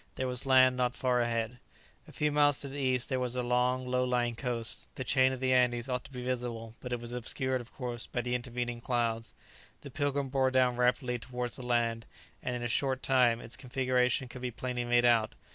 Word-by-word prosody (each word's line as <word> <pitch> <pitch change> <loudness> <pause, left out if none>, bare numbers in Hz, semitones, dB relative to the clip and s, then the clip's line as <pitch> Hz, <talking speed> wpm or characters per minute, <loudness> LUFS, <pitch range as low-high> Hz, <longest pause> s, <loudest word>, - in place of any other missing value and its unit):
There 130 - -2
was 125 +1 0
land 130 -1 +6
not 125 -1 0
far 125 -1 +1
ahead. 120 +1 -1 0.5
A - - -12
few 150 0 0
miles 145 -1 +4
to 140 - -4
the 140 +1 -6
east 130 -2 +1
there 130 -2 -1
was 125 -1 -1
a 125 - -1
long 125 +1 +1
low 125 0 +1
lying 125 -1 +1
coast; 115 -2 -4
the 130 - -4
chain 130 0 +3
of 130 - -4
the 130 0 +2
Andes 125 -1 +2
ought 125 -1 -2
to - - -12
be 125 -2 -6
visible; 120 -3 -3
but 125 - -7
it 120 - -1
was 120 0 -8
obscured, 130 +1 -1
of 120 - -14
course, 120 -3 -4
by 120 - -2
the 125 +1 -3
intervening 120 -1 -3
clouds. 115 -2 -1 0.5
The 140 - -9
"Pilgrim" 140 -1 -1
bore 130 -1 +2
down 130 -1 +3
rapidly 125 0 +1
towards 125 0 -4
the - - -7
land, 115 -2 0 0.3
and 125 - -2
in 120 - -4
a - - 0
short 130 +2 0
time 125 -3 +4
its 115 - -6
configuration 125 -1 0
could 125 +1 -10
be 125 - -2
plainly 125 0 -3
made 120 0 +3
out. 115 -2 +3
125 Hz, 225 wpm, -31 LUFS, 120-130 Hz, 0.5 s, land